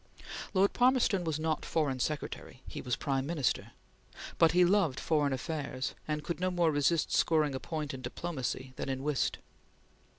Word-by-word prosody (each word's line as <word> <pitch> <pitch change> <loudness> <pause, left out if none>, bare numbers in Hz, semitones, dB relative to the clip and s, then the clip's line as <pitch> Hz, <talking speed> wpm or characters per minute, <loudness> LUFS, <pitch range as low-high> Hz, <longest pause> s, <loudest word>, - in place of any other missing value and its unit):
Lord 195 +1 +4
Palmerston 245 -7 +3
was 160 -2 -1
not 160 0 -1
Foreign 145 -5 0
Secretary; 150 +4 -4
he - - -6
was 125 - -1
Prime 135 -2 -1
Minister, 150 -7 -1 0.7
but 165 - +6
he 180 0 +6
loved 175 -7 +2
foreign 150 -3 +1
affairs 135 -1 -3
and 150 -1 -2
could 170 - -3
no 185 +1 +1
more 175 -3 +2
resist 145 +3 +2
scoring 155 -3 +3
a 130 - -3
point 155 -2 -4
in 130 - -6
diplomacy 130 -1 -4
than - - -3
in 135 0 -2
whist. 150 -2 0
155 Hz, 165 wpm, -31 LUFS, 135-170 Hz, 0.7 s, but